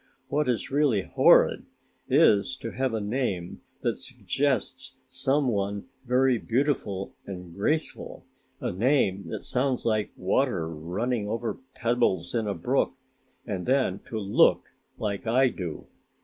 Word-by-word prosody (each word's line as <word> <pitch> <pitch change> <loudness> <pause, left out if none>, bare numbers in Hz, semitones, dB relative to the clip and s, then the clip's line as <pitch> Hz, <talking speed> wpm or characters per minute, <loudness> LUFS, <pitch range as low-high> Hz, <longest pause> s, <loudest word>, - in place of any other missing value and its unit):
"What 150 -2 +1
is 120 0 -1
really 135 -9 +2
horrid - - +5 0.5
is 105 +6 +4
to 115 - -6
have 130 -2 -1
a - - 0
name 105 -5 -2 0.2
that - - +1
suggests 135 -1 -2
some 135 +2 0
one 100 0 -2 0.2
very 125 0 +3
beautiful 115 -7 -1
and 90 -3 -7
graceful 150 - -2 0.3
a - - -2
name 100 - +1
that - - -5
sounds 130 0 0
like 110 -2 +1
water 95 -2 +1
running 100 +8 -2
over 115 +3 -3 0.2
pebbles 115 -8 +1
in 115 -3 0
a 100 - -1
brook 130 +10 0 0.5
and 95 -5 -4
then 130 -7 +2
to 110 - -4
look 100 -1 +3 0.3
like 105 0 -3
I 130 +3 +4
do. 90 -9 -6
115 Hz, 135 wpm, -27 LUFS, 100-130 Hz, 0.5 s, horrid